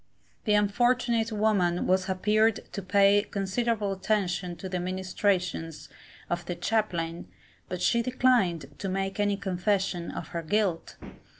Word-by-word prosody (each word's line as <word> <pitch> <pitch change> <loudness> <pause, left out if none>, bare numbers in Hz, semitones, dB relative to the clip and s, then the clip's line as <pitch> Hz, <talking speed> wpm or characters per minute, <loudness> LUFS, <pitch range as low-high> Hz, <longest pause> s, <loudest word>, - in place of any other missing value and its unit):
The 210 - +3
unfortunate 230 +2 +2
woman 205 -5 +1
has 185 0 +2
appearod 210 +3 +1
to 200 - -4
pay 200 +2 +4
considerable 205 +1 -1
attention 190 -2 -1
to 190 - -7
the 180 -1 -2
ministrations 185 -3 -2 0.4
of 175 0 -2
the 175 - -2
chaplain, 175 -6 -1 0.4
but 180 - -4
she 235 - +3
declined 235 - +1
to 195 - -3
make 195 +1 -2
any 205 -1 +1
confession 185 -1 -1
of - - -6
her 170 - -3
guilt. 180 0 -1
195 Hz, 130 wpm, -28 LUFS, 180-215 Hz, 0.4 s, pay